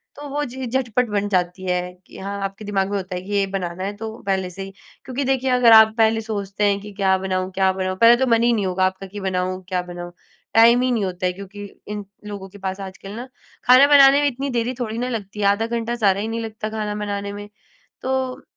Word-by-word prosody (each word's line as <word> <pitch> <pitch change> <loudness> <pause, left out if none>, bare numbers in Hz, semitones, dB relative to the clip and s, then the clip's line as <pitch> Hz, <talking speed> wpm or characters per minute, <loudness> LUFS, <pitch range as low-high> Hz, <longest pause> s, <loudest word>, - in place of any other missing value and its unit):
तो 290 0 -8
वो 290 +2 -2
चीज़ें 255 -1 -6
झटपट 245 0 0
बन 205 -1 0
जाती 180 -1 -1
हैं 180 0 -2
कि - - -13
हाँ, 200 +1 -5
आपके 195 +2 -5
दिमाग 195 -1 0
में 205 - 0
होता 185 -1 -5
है 180 - -4
कि 190 +3 -10
ये 200 -1 +2
बनाना 185 -2 -4
है, 200 +2 -3
तो 220 +1 -6
पहले 190 -2 0
से 180 +2 -9
ही। 195 0 -9 0.3
क्योंकि 260 +2 -3
देखिए, 265 0 +1
अगर 250 -2 +5
आप 220 0 +8
पहले 225 0 +3
सोचते 205 -2 -4
हैं 200 -1 +3
कि 210 +1 -9
क्या 190 -1 +2
बनाऊँ 185 0 -2
क्या 190 0 +3
बनाऊँ? 185 0 -3
पहले 235 +1 +8
तो 265 +1 +1
मन 230 0 +4
ही 240 - +4
नहीं 210 -4 0
होगा 185 0 +1
आपका 190 +1 -3
कि 205 - -5
बनाऊँ, 185 -1 -2
क्या 180 -1 0
बनाऊँ? 175 0 -8 0.4
टाइम 235 +2 +7
ही 255 0 +1
नहीं 225 -5 0
होता 185 0 -4
है 180 - +2
क्योंकि 200 +2 -9 0.2
इन 210 -1 -5 0.2
लोगों 200 -2 -7
के 205 - -14
पास। 190 0 -3
आजकल 195 0 -9
ना, 245 +3 -7 0.4
खाना 255 +3 +8
बनाने 280 -1 +7
में 290 - +3
इतनी 275 +2 -4
देरी 240 0 -1
थोड़ी 225 -2 -3
ना 250 +1 -2
लगती 210 -4 -5
है, 205 - +1
आधा 205 +3 +2
घंटा 235 0 -2
सारा 200 -4 +2
ही 215 - -3
नहीं 225 +1 -3
लगता 220 -1 -5
खाना 215 -1 -3
बनाने 200 -1 -3
में। 205 0 -8 0.5
तो 260 0 -2
205 Hz, 245 wpm, -21 LUFS, 190-235 Hz, 0.5 s, आप